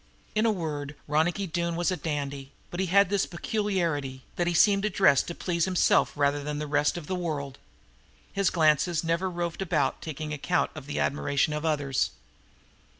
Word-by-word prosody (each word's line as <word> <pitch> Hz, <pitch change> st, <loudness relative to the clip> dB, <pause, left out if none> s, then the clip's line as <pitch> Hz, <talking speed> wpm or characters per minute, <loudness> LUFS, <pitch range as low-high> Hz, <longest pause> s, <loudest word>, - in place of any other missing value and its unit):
In 215 Hz, +2 st, +2 dB
a -, -, +4 dB
word 150 Hz, -6 st, -4 dB
Ronicky 160 Hz, +6 st, +1 dB
Doone 170 Hz, 0 st, -2 dB
was 175 Hz, +2 st, +1 dB
a -, -, 0 dB
dandy, 140 Hz, -3 st, -4 dB, 0.2 s
but 175 Hz, -, -5 dB
he 190 Hz, -, +1 dB
had 200 Hz, +2 st, +4 dB
this 200 Hz, -1 st, +1 dB
peculiarity, 170 Hz, -, -2 dB
that 175 Hz, -, 0 dB
he 175 Hz, -, +1 dB
seemed 200 Hz, +3 st, +5 dB
to 215 Hz, -, +1 dB
dress 175 Hz, -8 st, +4 dB
to 170 Hz, -, -6 dB
please 170 Hz, -2 st, 0 dB
himself 185 Hz, -2 st, +3 dB
rather 145 Hz, 0 st, +1 dB
than 150 Hz, 0 st, -3 dB
the 150 Hz, -, -3 dB
rest 145 Hz, +2 st, +1 dB
of 170 Hz, -, -6 dB
the 185 Hz, -, -3 dB
world. 150 Hz, -7 st, -3 dB, 0.7 s
His 200 Hz, -1 st, +2 dB
glances 160 Hz, +1 st, +2 dB
never 170 Hz, +3 st, 0 dB
roved 175 Hz, 0 st, -3 dB
about 190 Hz, -, 0 dB
taking 155 Hz, -1 st, -5 dB
account 165 Hz, +4 st, 0 dB
of 150 Hz, -3 st, -9 dB
the 145 Hz, -, -3 dB
admiration 145 Hz, +1 st, +1 dB
of 150 Hz, +1 st, -3 dB
others. 145 Hz, -4 st, +1 dB
165 Hz, 185 wpm, -27 LUFS, 145-180 Hz, 0.7 s, seemed